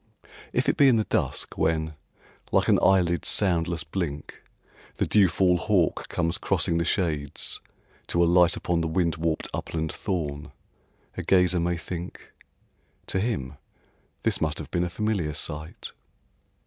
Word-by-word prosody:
If - - 0
it - - +2
be 140 - +6
in 130 - +5
the 110 - +2
dusk - - -2
when, 80 -1 0 0.6
like - - +3
an - - +4
eyelid's 85 -4 +3
soundless 85 -5 +2
blink, 75 -2 -5 0.5
The - - 0
dewfall 95 -2 +4
hawk 90 -2 +1
comes 85 +1 -1
crossing 85 - 0
the 85 - 0
shades 75 -6 -1 0.5
to 85 - +2
alight 90 +2 +4
Upon 85 -1 0
the 80 - -1
wind 85 0 0
warped 80 -1 -1
upland 80 -1 -3
thorn, 80 -6 -4 0.6
a - - -2
gazer 90 -1 +3
may 85 +1 0
think, 85 +1 -7 0.7
"To 95 - -1
him 95 - -2 0.7
this - - +1
must - - 0
have - - -7
been 85 - +1
a 90 - -2
familiar 95 -6 -1
sight." 75 +1 -5
85 Hz, 145 wpm, -26 LUFS, 80-90 Hz, 0.7 s, be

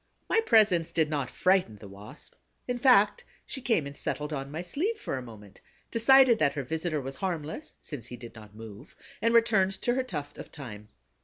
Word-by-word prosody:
My 450 - +3
presence 215 - +3
did 155 -2 +1
not 140 -4 -2
frighten 185 - +1
the 105 0 -12
Wasp; 100 +2 -13 0.3
in 245 0 -2
fact, 210 -5 +4 0.2
she 265 - -7
came 225 - +1
and 140 0 -8
settled 150 +2 -3
on 135 -1 -4
my 160 +4 -5
sleeve 355 - -2
for - - -4
a 130 - -4
moment, 105 -5 -13 0.3
decided 245 0 +6
that 140 -2 +2
her 140 - -3
visitor 160 +3 -2
was 135 0 -6
harmless, 175 - -4
since 125 -7 -8
he 125 - -9
did 120 0 -11
not 105 -2 -14
move, 110 -2 -12 0.3
and 230 - +2
returned 215 -5 +3
to 240 - +2
her 260 - +1
tuft 150 - -7
of - - -8
thyme. 110 -8 -10
155 Hz, 200 wpm, -28 LUFS, -, 0.3 s, decided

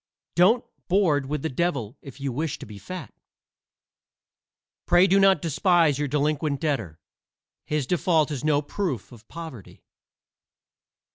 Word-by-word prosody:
Don't 205 +8 +4 0.2
board 170 -8 +2
with 150 0 -3
the - - 0
devil 135 -6 -2
if 135 -1 -12
you 140 -1 -2
wish 150 +4 -2
to - - -9
be 105 -1 -11
fat. 175 - -8 1.7
Pray 175 +2 +6
do 195 +1 +4
not 195 -5 +4
despise 165 -2 +3
your 145 - 0
delinquent 150 0 0
debtor; 110 - -2 0.7
his 150 -3 -1
default 160 -1 +1
is 140 -4 -4
no 150 -1 +2
proof 145 - -3
of 115 -2 -15
poverty. 160 - -10
150 Hz, 135 wpm, -25 LUFS, 135-175 Hz, 1.7 s, Pray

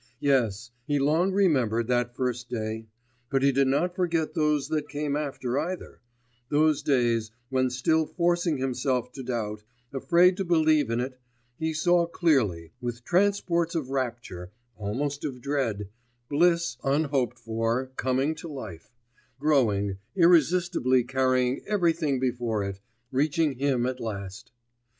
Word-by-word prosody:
Yes; 120 -6 +1 0.2
he 145 - +1
long 155 +7 +2
remembered 130 - +2
that 120 0 0
first 125 -1 -2
day... 110 -1 -4 0.4
but 135 -1 +1
he 140 - +5
did 135 0 +2
not 175 +7 +1
forget 170 -4 0
those 150 -3 +1
that 150 -2 -2
came 145 0 -2
after 140 -3 -2
either 175 +4 -5 0.5
those 150 0 +3
days, 120 -5 +1 0.2
when 130 -1 +1
still 155 +6 +1
forcing 175 -2 +1
himself 130 -1 -1
to 135 - -8
doubt, 110 -4 -3 0.3
afraid 175 +6 +4
to 195 - -1
believe 155 -6 +3
in 115 +1 0
it, 130 +1 -4 0.4
he 160 0 0
saw 170 +2 +2
clearly, 110 - +1
with 120 0 -4
transports 175 -2 +1
of 140 -5 -2
rapture, 120 -9 -4 0.3
almost 135 +8 -3
of 135 -4 -4
dread, 120 -8 -2 0.4
bliss 170 -1 +2
un 140 +3 +2
hoped 135 -6 -1
for 115 +3 -2
coming 130 +4 0
to 160 +2 -9
life, 115 - -9 0.4
growing, 110 -10 +2 0.2
irresistibly 170 -6 +4
carrying 130 0 +1
everything 165 -8 +1
before 120 -4 -1
it, 100 0 -5 0.3
reaching 150 +3 +1
him 135 -3 +1
at 130 0 -2
last. 100 -4 -6
135 Hz, 135 wpm, -27 LUFS, 120-155 Hz, 0.5 s, he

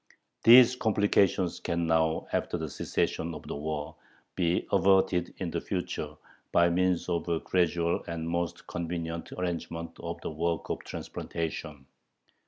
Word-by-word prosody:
These 125 +2 +8
complications 100 -5 +2
can 85 0 -1
now, 80 -1 +2
after - - 0
the 80 -2 -4
cessation 80 +4 -1
of - - -9
the - - -4
war, 75 +1 -4 0.4
be 85 -1 +1
averted 95 -2 +3
in 90 -3 -3
the 85 - -2
future 90 -5 -3 0.4
by 85 0 +5
means 90 0 +1
of 85 -1 -1
a 85 -1 +1
gradual 85 -1 +1
and 80 -1 -4
most 85 0 -2
convenient 85 -1 -4
arrangement 85 -2 -4
of 85 0 -5
the - - -4
work 85 +2 -2
of - - -2
transplantation.... 75 -3 -5
85 Hz, 140 wpm, -29 LUFS, 80-90 Hz, 0.4 s, These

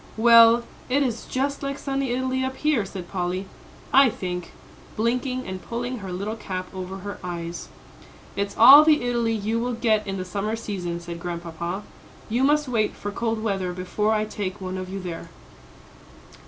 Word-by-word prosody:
"Well, 230 +1 +7 0.3
it 280 +3 +3
is 235 -4 -2
just 275 +2 -1
like 275 0 -3
sunny 275 -1 -2
Italy 260 +1 0
up 260 0 -2
here," 295 -9 +1
said 190 -2 -7
Polly, 185 +1 -2 0.5
"I 270 -1 +7
think," 180 -4 -5 0.4
blinking, 250 +3 -1
and 185 0 -6
pulling 245 +1 -4
her 195 -2 -7
little 200 +5 -3
cap 185 -4 -6
over 190 0 -6
her 200 +1 -7
eyes. 170 -1 -5 0.7
"It's 200 0 -3
all 270 +6 +10
the 305 -3 +4
Italy 235 -2 +1
you 220 +2 -1
will 245 +1 -1
get 220 -3 +1
in 195 0 -3
the 185 - -4
summer 205 +4 -2
season," 185 -6 -4
said 170 0 -7
Grandpapa. 170 +2 -5 0.5
"You 240 +4 +1
must 295 +1 +3
wait 225 -4 0
for 205 - -5
cold 225 +1 -2
weather 195 -4 -1
before 185 +4 -1
I 215 -1 +1
take 205 -3 -5
one 185 0 -4
of 185 0 -6
you 195 +1 -4
there." 175 -3 -6
215 Hz, 175 wpm, -24 LUFS, 185-245 Hz, 0.7 s, all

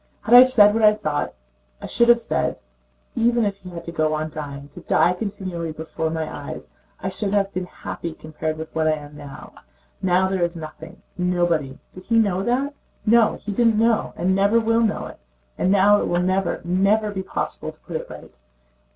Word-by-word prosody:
Had 230 - 0
I 245 - +12
said 230 -5 +6
what 225 - 0
I 210 -1 +6
thought, 155 -7 -3 0.4
I - - -8
should 235 0 +2
have 240 0 +7
said: - - -1 0.6
even 235 0 +2
if 200 -1 -2
he 185 -2 -11
had 170 -1 -8
to 170 - -6
go 155 -2 0
on 155 +1 -3
dying, 145 -2 -7
to 165 - -12
die 175 +1 +2
continually 180 -4 -5
before 160 +1 -4
my 160 0 -2
eyes, - - -8 0.3
I - - -3
should 205 -1 -2
have 200 -1 +1
been 185 0 -3
happy 170 -2 -7
compared 155 0 -5
with 160 0 -8
what 160 -1 0
I 155 - +3
am 145 -1 -8
now. 145 -2 -11 0.5
Now 185 0 +2
there 190 -1 -1
is 170 0 -1
nothing... 160 0 -10 0.2
nobody. 175 -6 0 0.2
Did 185 0 -12
he 230 - +2
know 200 -4 +2
that? 255 +7 0 0.3
No, 230 0 +4
he 210 - -6
did 225 +1 +2
not 225 0 +2
and 180 +3 +1
never 200 +4 +3
will 230 0 +2
know 220 -2 0
it. - - -11 0.4
And 185 - +1
now 205 +1 +5
it - - -1
will 175 0 +1
never, 185 -1 0
never 195 +5 +2
be 190 -2 -4
possible 190 - -4
to - - -26
put - - -8
it - - -4
right." - - -11
185 Hz, 205 wpm, -22 LUFS, 160-215 Hz, 0.6 s, I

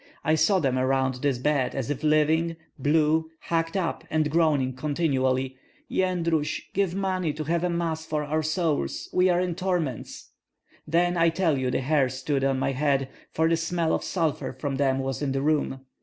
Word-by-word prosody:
I 155 - +2
saw 160 +5 +4
them 135 -7 +1
around 130 -1 +1
this 140 -3 +1
bed 135 -1 0
as 135 +1 -2
if 145 - -3
living, 155 +2 +2 0.2
blue, 155 +3 +2
hacked 165 +2 -1
up, 175 -3 -2
and 155 -2 +1
groaning 150 -5 +2
continually, 130 -2 0 0.3
'Yendrus! 170 -5 0
give 190 -2 0
money 185 -5 -1
to 155 - -4
have 170 +3 0
a 180 - +1
Mass 165 -2 -1
for 155 -1 -2
our 155 +2 0
souls; 155 -1 -1
we 185 0 +4
are 175 0 +3
in 180 -1 0
torments!' 175 - -3 0.6
Then 175 +3 +2
I 165 0 +5
tell 165 -2 +1
you 130 -1 -1
the 130 - 0
hair 135 -1 +2
stood 135 +2 -2
on 135 -1 +2
my 135 - 0
head, 135 -1 +1 0.2
for 160 +1 +2
the 165 - +3
smell 165 0 0
of - - 0
sulphur 165 -5 -1
from 140 -2 -3
them 135 -1 +2
was 135 +1 -3
in 140 -2 -1
the 135 - 0
room. 145 -3 0
155 Hz, 185 wpm, -26 LUFS, 135-165 Hz, 0.6 s, I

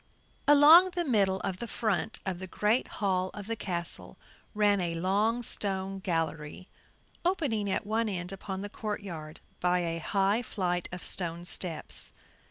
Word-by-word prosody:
Along 300 +6 +8
the 350 -1 0
middle 200 -7 +2
of 185 - -3
the 235 - -5
front 220 -1 -1
of 185 -2 -3
the 190 - -6
great 210 +6 +1
hall 185 -3 -1
of 205 -2 -7
the 230 +2 -2
castle, 175 -5 -4 0.4
ran 205 -2 +3
a 170 -1 -1
long 205 +7 +1
stone 195 -3 0
gallery, 165 -1 -3 0.6
opening 280 - 0
at 195 - -1
one 220 +1 0
end 180 -2 -3
upon 195 0 -5
the - - -3
court 210 0 -4
yard 155 -5 -8 0.2
by 180 0 +2
a 165 -1 -2
high 200 +6 +1
flight 180 -6 -2
of 180 0 -7
stone 170 -1 0
steps. 175 -3 -2
195 Hz, 160 wpm, -29 LUFS, 180-215 Hz, 0.6 s, Along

